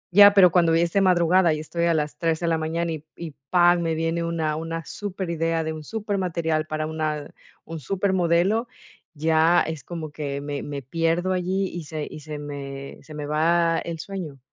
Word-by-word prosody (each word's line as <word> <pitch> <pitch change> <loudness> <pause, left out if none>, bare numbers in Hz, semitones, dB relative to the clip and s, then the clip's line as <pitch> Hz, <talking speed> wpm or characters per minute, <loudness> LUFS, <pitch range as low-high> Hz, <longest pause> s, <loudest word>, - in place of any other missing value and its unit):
Ya, 205 0 +10
pero 180 -4 +7
cuando 170 -2 +4
es 170 0 +1
de 200 - +3
madrugada, 175 -2 +4
y - - -5
estoy 170 +2 -2
a 170 -1 +3
las 150 -1 -2
3 165 -1 0
de 170 - -2
la 165 -1 +1
mañana 165 +1 -2
y 155 -1 -5
y, 170 -2 -7 0.2
pam, 175 -1 +5
me 165 -1 0
viene 165 +1 -1
una 160 -2 -1
una 165 0 -4
superidea, 170 -5 -2
de 160 0 -3
un 155 - -8
supermaterial 170 -6 -2
para 155 0 -2
una 155 -2 -3 0.3
un 165 0 -6
supermodelo, 190 - +1 0.5
ya 160 +3 +4
es 160 -5 -5
como 160 0 -6
que 145 -2 -4
me 145 0 -4
me 140 -1 -6
pierdo 165 +6 0
allí, 185 +2 0
y 170 -3 -7
se 155 -1 -4
y - - -9
se 150 0 -7
me 140 -1 -7
se 155 - -12
me 150 - -5
va 165 +2 +2
el 170 -1 -5
sueño. 165 -6 -6
165 Hz, 195 wpm, -24 LUFS, 155-175 Hz, 0.5 s, Ya